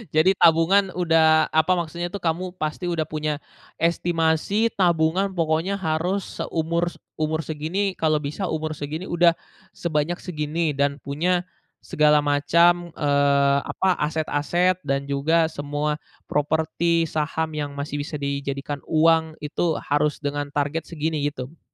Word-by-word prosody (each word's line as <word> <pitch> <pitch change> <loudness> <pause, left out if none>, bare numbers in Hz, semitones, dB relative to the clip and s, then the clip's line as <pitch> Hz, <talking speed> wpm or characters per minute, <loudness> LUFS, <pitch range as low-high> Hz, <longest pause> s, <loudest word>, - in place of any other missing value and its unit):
Jadi 180 +5 +5
tabungan 180 +4 +4
udah 160 -2 +4
apa 160 +3 +3
maksudnya 170 +1 -4
tuh, 200 - -5
kamu 175 +2 -2
pasti 155 +3 -3
udah 160 -2 -1
punya, 150 -1 -2 0.4
estimasi 170 +5 +1
tabungan 175 +1 +2
pokoknya 170 +3 0
harus 175 +4 -2
seumur 170 +2 -1
s - - -16 0.2
umur 155 0 -1
segini 175 +6 -2
kalau 155 -1 +1
bisa 150 +7 -5
umur 155 0 -3
segini 155 +6 -5
udah, 175 0 +4 0.4
sebanyak 170 +1 -2
segini 155 -2 -2
dan 140 0 0
punya, 175 +6 -1 0.4
segala 150 0 +4
macam, 170 +4 +3
eee, 140 -1 +3
apa, 190 -1 0
aset-aset 160 +4 +1
dan 140 -1 -1
juga 160 +4 +2
semua 145 0 -2 0.3
properti, 160 +3 +1
saham 155 +1 -2
yang 145 -1 -3
masih 145 0 -3
bisa 150 0 -5
dijadikan 140 0 -3
uang 160 0 +3
itu 155 +2 -1
harus 145 +1 0
dengan 145 -1 -3
target 145 +3 -1
segini 155 -2 -3
gitu? 140 +2 -9
160 Hz, 135 wpm, -23 LUFS, 145-170 Hz, 0.4 s, Jadi